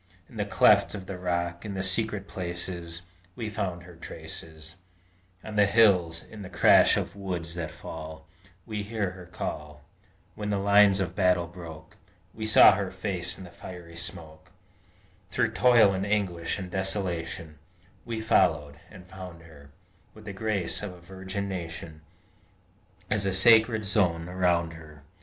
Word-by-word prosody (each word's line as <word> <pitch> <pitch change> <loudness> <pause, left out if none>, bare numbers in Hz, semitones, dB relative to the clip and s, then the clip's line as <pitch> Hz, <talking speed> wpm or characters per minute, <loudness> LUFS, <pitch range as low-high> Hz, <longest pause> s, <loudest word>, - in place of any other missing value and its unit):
In - - -14
the - - 0
clefts - - +4
of 95 -2 -7
the 95 -1 -7
rocks, 85 -1 -2
in 105 -2 -5
the 95 - -2
secret 100 +1 0
places, 85 -1 -4 0.3
We 110 -2 -4
found 90 -4 -3
her 90 0 -13
traces; 80 +1 -9 0.7
On 110 - -7
the 105 -1 +5
hills, 90 -7 +4
in 110 - -11
the 95 - -8
crash - - +5
of - - -3
woods 90 -4 -4
that 85 -3 -4
fall, 80 -1 -9 0.4
We 105 -2 -4
heard 100 -3 -3
her 90 -2 -12
call; 75 -4 -6 0.5
When 105 -1 -5
the 100 - +1
lines 100 0 +5
of 90 -2 -2
battle 90 -3 +2
broke, 85 -2 -11 0.4
We 110 0 -4
saw 110 - +8
her 100 -1 -2
face 95 -1 -3
in 95 - -9
the 90 - -11
fiery 85 -1 -10
smoke; 80 -2 -9 0.8
Through - - +1
toil, 120 -5 +5
and 95 0 -2
anguish, 100 -5 -1
and 95 -3 -7
desolation, 85 -5 -3 0.4
We 115 -1 -4
followed, 75 -9 +2
and 95 -3 -13
found 90 -3 -10
her 75 -3 -15 0.5
With 110 0 -14
the 100 - -6
grace 100 -3 -1
of 105 -3 -5
a 90 - -14
virgin 95 +2 -6
Nation 85 -4 -6 1.1
As 100 -2 +1
a 95 - +1
sacred 110 +2 +5
zone 90 -5 +2
around 90 -2 +1
her! 75 -3 -13
90 Hz, 155 wpm, -27 LUFS, 85-100 Hz, 1.1 s, saw